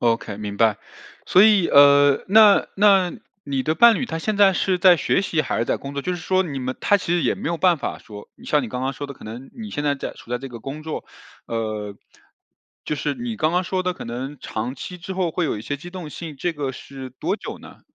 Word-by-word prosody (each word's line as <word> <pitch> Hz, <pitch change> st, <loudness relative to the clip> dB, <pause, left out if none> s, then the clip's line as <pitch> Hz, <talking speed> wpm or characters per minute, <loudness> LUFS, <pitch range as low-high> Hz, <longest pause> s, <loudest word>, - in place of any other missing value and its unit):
OK， 115 Hz, -3 st, 0 dB
明 105 Hz, -1 st, -6 dB
白， 110 Hz, -3 st, +3 dB, 0.5 s
所 185 Hz, -, +5 dB
以， 210 Hz, -5 st, +5 dB
呃， 140 Hz, 0 st, +6 dB
那 210 Hz, 0 st, +6 dB
那 195 Hz, -3 st, +4 dB, 0.3 s
你 135 Hz, -2 st, -2 dB
的 155 Hz, +4 st, 0 dB
伴 235 Hz, +4 st, +7 dB
侣 265 Hz, -, -2 dB
他 165 Hz, -9 st, -4 dB
现 215 Hz, +5 st, -2 dB
在 200 Hz, -1 st, +6 dB
是 185 Hz, 0 st, 0 dB
在 180 Hz, 0 st, +6 dB
学 190 Hz, -, +1 dB
习 165 Hz, -5 st, 0 dB
还 -, -, -2 dB
是 115 Hz, -, +1 dB
在 -, -, -1 dB
工 140 Hz, +1 st, -8 dB
作？ 140 Hz, -, -3 dB
就 180 Hz, -, -2 dB
是 175 Hz, -, -4 dB
说 185 Hz, +3 st, +1 dB
你 150 Hz, -7 st, -5 dB
们 130 Hz, 0 st, -4 dB
他 205 Hz, -, +3 dB
其 175 Hz, -2 st, -1 dB
实 175 Hz, -, 0 dB
也 125 Hz, -, +1 dB
没 -, -, -4 dB
有 170 Hz, -, -1 dB
办 175 Hz, -2 st, +3 dB
法 -, -, -4 dB
说 105 Hz, -1 st, -12 dB, 0.2 s
像 150 Hz, -1 st, +1 dB
你 120 Hz, -, -5 dB
刚 125 Hz, +3 st, -4 dB
刚 135 Hz, +1 st, -1 dB
说 145 Hz, +1 st, -6 dB
的 140 Hz, -, -9 dB
可 -, -, -15 dB
能 120 Hz, +5 st, -9 dB
你 220 Hz, -3 st, -8 dB
现 145 Hz, -, -3 dB
在 145 Hz, -1 st, +2 dB
在 140 Hz, -, -6 dB
处 -, -, -16 dB
在 125 Hz, -, 0 dB
这 135 Hz, +2 st, -8 dB
个 120 Hz, -2 st, -10 dB
工 140 Hz, +6 st, -7 dB
作 155 Hz, 0 st, -5 dB, 0.4 s
呃， 110 Hz, -3 st, -4 dB, 0.9 s
就 -, -, -2 dB
是 145 Hz, 0 st, -2 dB
你 235 Hz, +3 st, -5 dB
刚 155 Hz, -3 st, +1 dB
刚 180 Hz, +1 st, +1 dB
说 185 Hz, +1 st, -1 dB
的 180 Hz, 0 st, -1 dB
可 -, -, -9 dB
能 130 Hz, +5 st, -5 dB
长 115 Hz, +4 st, -4 dB
期 180 Hz, +7 st, -8 dB
之 185 Hz, +3 st, -7 dB
后 185 Hz, -2 st, 0 dB
会 170 Hz, +1 st, -1 dB
有 135 Hz, -, -2 dB
一 -, -, -8 dB
些 145 Hz, -, -3 dB
机 175 Hz, -, -10 dB
动 175 Hz, -4 st, -8 dB
性， 160 Hz, -1 st, -8 dB
这 175 Hz, +6 st, -2 dB
个 145 Hz, -4 st, -4 dB
是 135 Hz, 0 st, -9 dB
多 130 Hz, -, -3 dB
久 -, -, -8 dB
呢？ -, -, -14 dB
150 Hz, 280 characters per minute, -22 LUFS, 130-180 Hz, 0.9 s, 伴